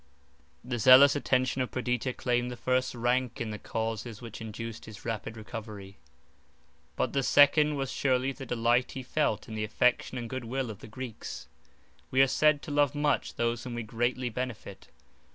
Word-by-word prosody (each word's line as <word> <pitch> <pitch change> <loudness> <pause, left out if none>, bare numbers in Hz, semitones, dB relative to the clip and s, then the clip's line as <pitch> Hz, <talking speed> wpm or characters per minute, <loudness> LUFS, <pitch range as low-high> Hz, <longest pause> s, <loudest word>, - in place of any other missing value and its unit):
The 120 -1 -3
zealous 130 +5 +8
attention 130 -2 +1
of 125 - -1
Perdita 125 0 -1
claimed 125 0 0
the 125 - -7
first 130 +1 0
rank 120 +1 0
in 115 -2 -3
the 105 - -6
causes 110 0 -4
which 115 -2 -9
induced 115 +1 -7
his 110 -2 -12
rapid 110 -1 -4
recovery; 105 -3 -8 1.0
but - - -1
the 140 - +2
second 150 +3 +5
was 135 -2 -3
surely 130 0 +1
the 135 -1 -9
delight 120 +1 +1
he 130 - -6
felt 125 -5 -1
in 110 - -8
the 110 0 -2
affection 125 +4 +1
and 120 -1 -4
good 130 0 -5
will 130 0 -2
of 105 - -11
the - - -11
Greeks. 120 0 -7 0.6
We 130 - 0
are - - +4
said 150 +2 +3
to - - -6
love 145 -1 +2
much 145 0 0
those 115 0 -1
whom 125 -2 -6
we 120 - -3
greatly 120 +3 -1
benefit. 120 -5 -6
125 Hz, 180 wpm, -29 LUFS, 115-130 Hz, 1.0 s, zealous